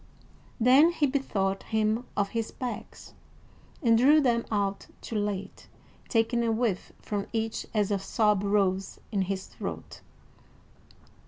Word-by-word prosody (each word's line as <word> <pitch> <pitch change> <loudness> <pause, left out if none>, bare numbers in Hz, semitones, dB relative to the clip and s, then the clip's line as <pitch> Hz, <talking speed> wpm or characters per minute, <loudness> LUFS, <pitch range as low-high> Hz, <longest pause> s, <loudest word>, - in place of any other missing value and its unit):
Then 270 +8 +6
he 305 - +2
bethought 200 -9 -1
him 220 +2 0
of 200 -1 +1
his 225 0 -2
bags, 250 -2 -7 0.7
and 230 -2 +5
drew 290 +5 +6
them 240 -5 +2
out 200 -2 -1
too - - -8
late, 205 -2 -3 0.4
taking 235 0 +2
a 230 - +1
whiff 220 -4 -1
from 205 -1 -3
each 225 0 -2
as 210 -2 +1
a 200 - +1
sob 210 +1 +1
rose 195 -2 0
in 200 -3 0
his 190 0 -2
throat. - - -7
215 Hz, 135 wpm, -28 LUFS, 200-235 Hz, 0.7 s, Then